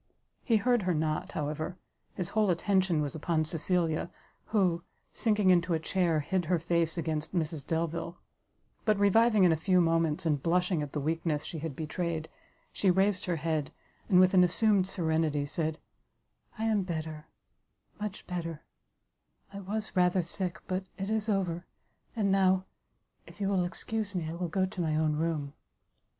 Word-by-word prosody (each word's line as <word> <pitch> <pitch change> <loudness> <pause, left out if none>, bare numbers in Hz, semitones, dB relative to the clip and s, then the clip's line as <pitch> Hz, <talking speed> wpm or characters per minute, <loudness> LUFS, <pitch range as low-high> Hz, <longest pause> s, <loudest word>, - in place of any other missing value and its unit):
He 230 - +2
heard 240 +2 +2
her 180 -2 0
not, 155 0 -1
however; 155 +4 -3 0.4
his 180 -3 -3
whole 215 -2 +2
attention 185 -2 +2
was 145 -2 -2
upon 160 0 0
Cecilia, 165 0 0 0.4
who, 185 -6 +1 0.3
sinking 210 -4 +3
into 175 -1 +3
a - - 0
chair, 165 -1 +1
hid 180 +4 -1
her 175 +2 +2
face 170 0 0
against 160 +1 -2
Mrs 160 -4 -2
Delvile: 165 +1 -2 0.7
but, 215 -2 +2
reviving 210 +1 +4
in 180 - +6
a - - +4
few 180 +3 +2
moments, 165 -2 +2
and 150 -4 +1
blushing 180 0 +1
at 145 -2 -5
the 150 - -1
weakness 155 0 -1
she 165 - -5
had 155 -2 -5
betrayed, 160 +1 -3 0.4
she 195 - +2
raised 190 +1 +2
her 180 -3 0
head, 155 -2 -1 0.4
and, 180 -3 +6
with 185 0 +5
an 185 -1 +7
assumed 190 +1 +3
serenity, 160 -5 0
said, 155 +1 -2 0.8
"I 220 - -3
am 220 -2 +2
better, 160 -3 -5 0.7
much 210 -1 -5
better, 165 -3 -5 0.9
I 200 - -6
was 210 +3 -4
rather 180 0 +3
sick, 180 +1 -4
but 185 0 -2
it 195 +2 -3
is 220 0 -1
over; 180 -4 -1 0.5
and 205 -4 +1
now, 190 -1 +3 0.6
if - - -15
you 195 -1 0
will 185 -3 +2
excuse 205 +3 -4
me, 170 -3 -2
I 160 - -4
will 175 +1 -3
go 185 +3 +1
to 190 -1 -5
my 155 -2 0
own 155 -1 +1
room." 155 -3 -2
175 Hz, 165 wpm, -30 LUFS, 160-190 Hz, 0.9 s, an